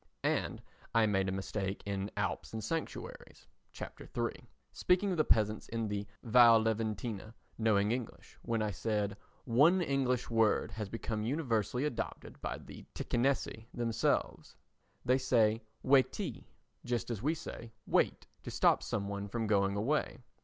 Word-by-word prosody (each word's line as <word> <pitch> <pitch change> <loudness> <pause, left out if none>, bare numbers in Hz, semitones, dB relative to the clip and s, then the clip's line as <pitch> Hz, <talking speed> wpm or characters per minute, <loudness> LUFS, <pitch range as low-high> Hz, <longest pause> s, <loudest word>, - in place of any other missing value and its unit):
And - - 0 0.3
I 115 -1 +6
made 95 -2 +1
a - - -1
mistake 95 0 -3
in 100 0 -2
Alps 95 +1 -2
and 110 -1 -4
Sanctuaries 165 - -5 0.3
[Chap. - - -8 0.2
III], - - -2 0.2
speaking 190 +2 +2
of 180 - -1
the 155 - +4
peasants 110 -4 +2
in 115 -1 -2
the 105 0 -3 0.2
Val 115 -1 +7
Leventina 110 -1 -2 0.2
knowing 105 -2 +3
English, 120 -2 -5
when 115 -2 -1
I 105 - -1
said 105 0 -1 0.3
"One 145 +10 +5
English 135 -6 +1
word 115 -2 +2
has 105 -3 -5
become 115 -1 -3
universally 125 -1 0
adopted 150 -6 -4
by - - -3
the - - -11
Ticinesi 120 -3 0
themselves. 115 -2 0 0.5
They 130 +2 +4
say 115 -4 +3 0.2
'Waitee' 135 -1 +2 0.4
just 120 0 -2
as 110 -4 -3
we 155 +6 +1
should 165 - -9
say 115 -1 -10
'Wait' - - +1 0.2
to - - -7
stop - - +3
some 100 -1 -2
one 100 0 -4
from 115 +3 -2
going 100 -2 +2
away. 140 +9 0
115 Hz, 150 wpm, -33 LUFS, 105-125 Hz, 0.5 s, Val